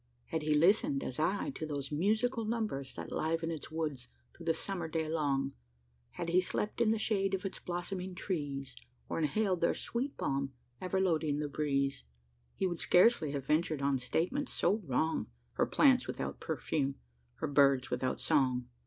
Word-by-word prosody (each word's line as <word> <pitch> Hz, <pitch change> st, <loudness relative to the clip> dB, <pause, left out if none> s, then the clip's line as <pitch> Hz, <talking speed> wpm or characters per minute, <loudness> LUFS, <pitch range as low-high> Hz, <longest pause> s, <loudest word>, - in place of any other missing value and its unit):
Had 160 Hz, -, -1 dB
he 150 Hz, 0 st, +2 dB
listened, 220 Hz, -, +4 dB
as 130 Hz, -, -4 dB
I, 195 Hz, -, +1 dB
to 215 Hz, -, -7 dB
those 145 Hz, -3 st, -3 dB
musical 220 Hz, -, +1 dB
numbers 215 Hz, -, -2 dB
That -, -, -7 dB
liven 165 Hz, +1 st, 0 dB
its 160 Hz, -3 st, -5 dB
woods 150 Hz, -6 st, -3 dB, 0.3 s
through 170 Hz, -, -11 dB
the 165 Hz, -, +4 dB
summer 185 Hz, -4 st, -2 dB
day 160 Hz, 0 st, -1 dB
long 140 Hz, -4 st, 0 dB, 0.6 s
Had 170 Hz, -, -3 dB
he 180 Hz, +2 st, +4 dB
slept 210 Hz, +5 st, -2 dB
in 230 Hz, -, +4 dB
the 225 Hz, -, +3 dB
shade 195 Hz, -3 st, +1 dB
of 195 Hz, +1 st, -6 dB
its 195 Hz, -, -4 dB
blossoming 180 Hz, +1 st, -4 dB
trees, 140 Hz, -9 st, -3 dB, 0.3 s
Or -, -, -1 dB
inhaled 185 Hz, +4 st, +1 dB
their 170 Hz, -, +3 dB
sweet 260 Hz, +4 st, -3 dB
balm 135 Hz, 0 st, -1 dB, 0.3 s
ever 185 Hz, +1 st, 0 dB
loading 160 Hz, -6 st, +1 dB
the 150 Hz, 0 st, -1 dB
breeze, 140 Hz, -2 st, 0 dB, 0.5 s
He -, -, 0 dB
would 175 Hz, -3 st, -1 dB
scarcely 180 Hz, -4 st, +5 dB
have 140 Hz, -2 st, -3 dB
ventured 155 Hz, -1 st, +1 dB
on 140 Hz, -1 st, +2 dB
statement 185 Hz, -, -1 dB
so 205 Hz, -, +2 dB
wrong 155 Hz, +5 st, 0 dB, 0.3 s
"Her -, -, +1 dB
plants -, -, +4 dB
without -, -, -4 dB
perfume, 140 Hz, -3 st, -1 dB, 0.4 s
her -, -, -3 dB
birds 135 Hz, -3 st, +4 dB
without 130 Hz, +1 st, -1 dB
song." 130 Hz, -5 st, +2 dB
160 Hz, 170 wpm, -33 LUFS, 140-190 Hz, 0.6 s, scarcely